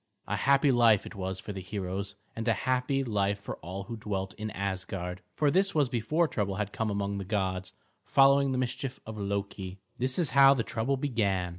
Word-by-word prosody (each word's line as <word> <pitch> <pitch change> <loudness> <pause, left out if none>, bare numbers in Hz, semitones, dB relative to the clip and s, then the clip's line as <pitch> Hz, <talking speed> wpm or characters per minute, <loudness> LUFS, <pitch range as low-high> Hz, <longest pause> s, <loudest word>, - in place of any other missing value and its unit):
A - - -1
happy 140 +1 +4
life 115 -5 +5
it - - -8
was 95 -1 -3
for 105 - -6
the 95 - -5
heroes, 95 +1 -4 0.2
and 115 +1 -4
a 115 - +5
happy 130 +2 +1
life 100 -4 0
for 100 - -6
all 95 +4 -6
who 115 +4 -6
dwelt 95 -3 -3
in 110 +1 -5
Asgard; 95 -2 -4
for 150 -2 +3
this 195 +2 +2
was 145 -4 +3
before 155 +8 +1
trouble 100 -7 -1
had 105 0 -3
come 115 -1 -1
among 100 0 -1
the - - -3
gods, 95 -2 -2 0.3
following 140 0 +5
the 130 - 0
mischief 125 +1 -2
of 110 -1 -7
Loki. 100 -1 -3 0.2
This 130 +1 0
is 170 -6 +1
how 140 0 +7
the 120 - 0
trouble 115 +6 -1
began. 105 -10 0
105 Hz, 200 wpm, -29 LUFS, 95-130 Hz, 0.3 s, how